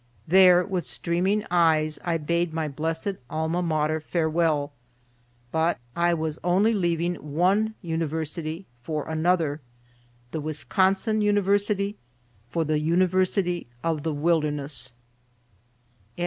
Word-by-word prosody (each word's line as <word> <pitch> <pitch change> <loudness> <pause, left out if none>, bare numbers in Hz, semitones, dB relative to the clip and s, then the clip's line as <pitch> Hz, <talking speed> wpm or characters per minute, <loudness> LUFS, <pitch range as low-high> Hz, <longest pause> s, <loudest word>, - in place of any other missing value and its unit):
There 180 0 +6
with 185 -3 -2
streaming 185 +8 -1
eyes 155 -3 +3
I 170 -2 0
bade 170 +2 -1
my 160 -1 -1
blessed 160 +6 -2
Alma 160 +3 -1
Mater 155 -2 0
farewell. 160 -2 0 0.8
But 160 +2 +1 0.2
I 170 0 +2
was 160 -1 -3
only 190 +6 +3
leaving 175 -3 0
one 190 +9 +1
University 160 +1 -3 0.2
for 150 +2 -4
another, 160 -2 +1 0.7
the 160 - -3
Wisconsin 190 +7 +1
University 205 0 +1 0.5
for 165 +4 -1
the 155 0 +1
University 180 - +1 0.2
of 160 -2 0
the 160 - -2
Wilderness. 150 -4 -1
165 Hz, 105 wpm, -25 LUFS, 155-185 Hz, 0.8 s, There